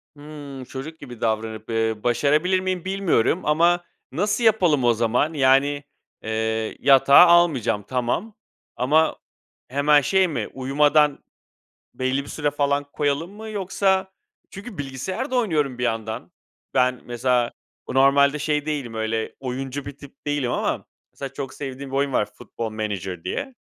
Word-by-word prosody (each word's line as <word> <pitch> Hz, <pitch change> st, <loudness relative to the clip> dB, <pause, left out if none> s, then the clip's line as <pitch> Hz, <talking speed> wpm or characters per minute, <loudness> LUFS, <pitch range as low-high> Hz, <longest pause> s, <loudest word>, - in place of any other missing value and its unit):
Hımm, 145 Hz, -2 st, -9 dB
çocuk 140 Hz, +5 st, -8 dB
gibi 125 Hz, -5 st, -11 dB
davranıp, 110 Hz, -1 st, -2 dB
eee, 115 Hz, -1 st, 0 dB
başarabilir 150 Hz, +10 st, +2 dB
miyim 185 Hz, -1 st, -3 dB
bilmiyorum 185 Hz, -5 st, +1 dB
ama 170 Hz, +3 st, +3 dB, 0.3 s
nasıl 205 Hz, -, 0 dB
yapalım 180 Hz, -, +3 dB
o 120 Hz, -1 st, +4 dB
zaman? 120 Hz, +7 st, +1 dB
Yani, 140 Hz, +1 st, +3 dB, 0.4 s
eee, 110 Hz, 0 st, -2 dB
yatağa 140 Hz, +4 st, +7 dB
almayacağım, 155 Hz, -12 st, +3 dB
tamam 130 Hz, -, -2 dB, 0.4 s
ama 150 Hz, +6 st, +2 dB, 0.5 s
hemen 145 Hz, +3 st, +4 dB
şey 190 Hz, +6 st, +3 dB
mi, 155 Hz, -, -3 dB
uyumadan 145 Hz, +2 st, +2 dB, 0.7 s
belli 130 Hz, +2 st, -1 dB
bir -, -, -12 dB
süre 150 Hz, -2 st, -1 dB
falan 145 Hz, 0 st, 0 dB
koyalım 150 Hz, +5 st, -1 dB
mı 220 Hz, +2 st, -9 dB
yoksa 190 Hz, -2 st, 0 dB, 0.4 s
Çünkü 200 Hz, +1 st, -9 dB
bilgisayar 145 Hz, -, -4 dB
da 260 Hz, -, 0 dB
oynuyorum 150 Hz, -, 0 dB
bir 125 Hz, -, -1 dB
yandan. 115 Hz, +6 st, -3 dB, 0.4 s
Ben 125 Hz, -1 st, +2 dB
mesela 120 Hz, 0 st, 0 dB, 0.4 s
normalde 140 Hz, +2 st, +4 dB
şey 150 Hz, 0 st, -1 dB
değilim, 140 Hz, -7 st, -3 dB
öyle, 110 Hz, 0 st, -2 dB
oyuncu 135 Hz, +1 st, -4 dB
bir 145 Hz, -1 st, -7 dB
tip 140 Hz, 0 st, -16 dB
değilim 145 Hz, -4 st, 0 dB
ama -, -, -1 dB, 0.3 s
mesela 135 Hz, -1 st, -7 dB
çok 135 Hz, -1 st, -6 dB
sevdiğim 135 Hz, -1 st, -7 dB
bir 135 Hz, -, -3 dB
oyun 140 Hz, -1 st, +1 dB
var, 105 Hz, -, +2 dB
Football 115 Hz, -1 st, -6 dB
Manager 100 Hz, -5 st, -4 dB
diye. 265 Hz, -2 st, -4 dB
140 Hz, 140 wpm, -23 LUFS, 125-160 Hz, 0.7 s, yatağa